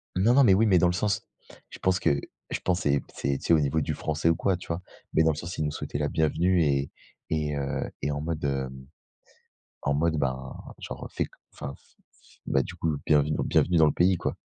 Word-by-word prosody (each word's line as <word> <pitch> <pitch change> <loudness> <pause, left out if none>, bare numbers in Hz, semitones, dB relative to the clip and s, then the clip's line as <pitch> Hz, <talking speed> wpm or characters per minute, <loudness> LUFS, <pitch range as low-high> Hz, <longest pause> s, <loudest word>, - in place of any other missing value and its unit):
non, 110 +7 +4
non, 140 - +7
mais 95 - +6
oui, 110 +4 +4
mais 95 -4 +5
dans 90 +1 +4
le 90 - +1
sens 100 +2 0 0.5
je - - -11
pense 95 0 +2
que, 70 - +2 0.3
je - - -2
pense 90 0 0
c'est 70 -1 +2
c'est, 70 0 -1
tu - - -10
sais, 85 - +5
au 80 - +6
niveau 75 +2 +1
du - - -1
français 80 +1 0
ou 85 - +4
quoi, 95 +2 +1
tu 90 - -12
vois? 85 +2 -3 0.3
Mais 80 - +4
dans 80 - +4
le - - -3
sens 85 +4 -6
il 75 - 0
nous 75 - -1
souhaitait 75 - -4
la 75 0 0
bienvenue 85 +4 +2
et 70 -1 +1 0.4
et 75 -2 -1
heu 70 -1 -2
et 75 +2 0
en 75 0 -3
mode, 80 -1 -3
hem, 65 -1 -3 1.0
en 70 - +1
mode, 80 +2 +1
ben, 65 -1 -2 0.2
genre, - - -7
heu, - - -5
fais - - -1
co - - -20 0.2
enfin, 70 - -6
f - - -26 0.3
f - - -24
bah, 70 - +2
du 90 - -8
coup, 80 -3 -1
bienvenue 75 0 +3
bienvenue 90 -2 +3
dans 80 - +7
le 75 - +4
pays, 90 +4 +3
quoi. - - -2
80 Hz, 250 wpm, -27 LUFS, 70-90 Hz, 1.0 s, non